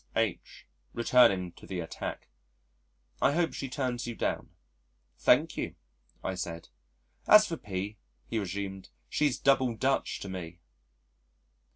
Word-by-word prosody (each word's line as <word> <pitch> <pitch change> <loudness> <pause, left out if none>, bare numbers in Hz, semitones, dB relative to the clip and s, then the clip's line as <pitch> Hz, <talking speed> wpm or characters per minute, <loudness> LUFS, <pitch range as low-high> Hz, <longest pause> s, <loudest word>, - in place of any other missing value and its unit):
H. 115 -6 -2 0.3
(returning 110 -7 +4
to - - -15
the 95 -2 -3
attack), 80 -1 -5 0.9
"I 140 - +4
hope 170 +1 +1
she 135 - -4
turns 125 -2 -2
you 120 - -4
down." - - -2 0.7
"Thank - - +4
you," - - -3 0.5
I 95 - -1
said. 85 -4 -5 0.6
"As 210 0 +9
for 170 - -3
P 100 0 -4 0.2
," - - -42
he 115 - -1
resumed, 95 0 -4 0.2
"she's 145 -4 +1
double 130 -4 +3
Dutch 135 +4 0
to - - -5
me." 85 -3 -6
110 Hz, 135 wpm, -30 LUFS, 95-130 Hz, 0.9 s, As